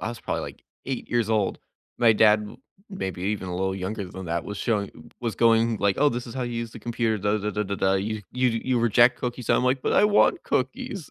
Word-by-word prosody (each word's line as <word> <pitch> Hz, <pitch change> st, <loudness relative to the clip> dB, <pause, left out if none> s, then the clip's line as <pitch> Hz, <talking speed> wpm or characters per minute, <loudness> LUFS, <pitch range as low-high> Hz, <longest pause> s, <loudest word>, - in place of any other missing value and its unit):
I -, -, -3 dB
was 120 Hz, -1 st, -7 dB
probably, -, -, -3 dB
like, -, -, -9 dB, 0.2 s
8 135 Hz, -2 st, -4 dB
years 120 Hz, -2 st, +1 dB
old. 105 Hz, -3 st, +1 dB, 0.4 s
My 115 Hz, -2 st, +6 dB
dad 105 Hz, 0 st, +5 dB
m 105 Hz, -, -9 dB, 0.3 s
maybe 95 Hz, -, -5 dB
even 100 Hz, -1 st, -2 dB
a 90 Hz, -, -4 dB
little 95 Hz, +1 st, -1 dB
younger 95 Hz, +1 st, -4 dB
than 95 Hz, +1 st, -8 dB
that, 85 Hz, 0 st, -2 dB
was 105 Hz, -, -6 dB
showing 100 Hz, -8 st, -3 dB
was 115 Hz, -4 st, -2 dB
going 115 Hz, 0 st, +3 dB
like, 100 Hz, -1 st, +1 dB
"Oh, 145 Hz, +2 st, +5 dB
this 120 Hz, -1 st, -4 dB
is 120 Hz, -, -8 dB
how 130 Hz, -, -3 dB
you 120 Hz, -1 st, -4 dB
use 115 Hz, -1 st, -4 dB
the -, -, -9 dB
computer, 115 Hz, -2 st, -1 dB
dah, 105 Hz, +2 st, +1 dB
dah, 105 Hz, +1 st, -2 dB
dah, 105 Hz, 0 st, -1 dB
dah, 100 Hz, -, -3 dB
dah. 95 Hz, -1 st, +1 dB
You 105 Hz, +2 st, -2 dB
you 125 Hz, 0 st, +2 dB, 0.2 s
you 130 Hz, -2 st, +1 dB
reject 120 Hz, +2 st, +4 dB
cookies." 125 Hz, -1 st, -3 dB
I'm -, -, +3 dB
like, 130 Hz, 0 st, +1 dB
"But -, -, 0 dB
I -, -, +5 dB
want 210 Hz, 0 st, +3 dB
cookies." 135 Hz, +6 st, -3 dB
110 Hz, 250 wpm, -25 LUFS, 100-120 Hz, 0.4 s, My